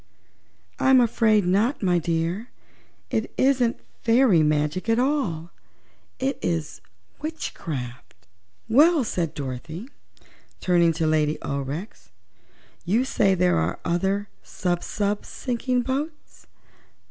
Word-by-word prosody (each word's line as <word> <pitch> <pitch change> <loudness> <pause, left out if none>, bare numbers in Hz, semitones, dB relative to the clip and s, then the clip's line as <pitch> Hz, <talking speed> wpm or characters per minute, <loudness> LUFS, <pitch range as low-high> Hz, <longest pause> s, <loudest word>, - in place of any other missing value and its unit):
"I'm 265 -1 +6
afraid 220 -4 +3
not, 205 +8 +1
my 180 -2 +3
dear. 170 +7 -2 0.6
It 220 - -1
isn't 260 -3 +2 0.2
fairy 230 -7 +4
magic 150 +6 0
at 225 - +3
all; 245 - 0 0.7
it 270 +1 -2
is 165 -2 -2 0.4
witchcraft." 150 - -5 0.5
"Well," 295 +6 +5
said 175 -8 -2
Dorothy, 150 - -6 0.7
turning 175 -2 +3
to 160 0 -1
Lady 155 -1 +2
Aurex, 140 - -5 0.7
"you 225 +8 +1
say 195 -6 +2
there 180 0 +3
are 80 +3 -1
other 195 +4 0
sub 175 -1 -2
sub 205 0 -1
sinking 250 0 -2
boats. 285 +5 -5
190 Hz, 105 wpm, -24 LUFS, 165-245 Hz, 0.7 s, I'm